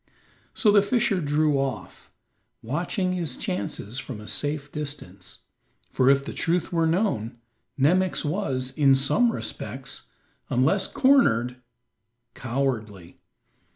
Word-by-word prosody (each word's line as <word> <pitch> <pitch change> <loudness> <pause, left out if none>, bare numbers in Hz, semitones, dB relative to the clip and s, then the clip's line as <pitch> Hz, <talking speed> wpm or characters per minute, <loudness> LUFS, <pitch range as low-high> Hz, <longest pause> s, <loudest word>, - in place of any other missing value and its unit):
So 215 - +4
the 205 0 +6
fisher 220 -2 +1
drew 150 -1 +2
off, 135 -1 -5 0.5
watching 175 - -1
his 165 -8 -3
chances 100 +5 -4
from 130 -5 -7
a 105 - -10
safe 145 +2 -3
distance, 120 -12 -7 0.5
for, 130 0 +3
if 140 0 +3
the - - -6
truth 175 +2 -1
were 165 -1 +2
known, 160 - 0 0.4
Nemox 175 +6 +2
was, 135 -7 -2
in 140 -2 +4
some 185 - +3
respects, - - -5 0.4
unless - - +2
cornered, 125 - +3 0.8
cowardly. 115 -8 -3
145 Hz, 115 wpm, -25 LUFS, 125-180 Hz, 0.8 s, the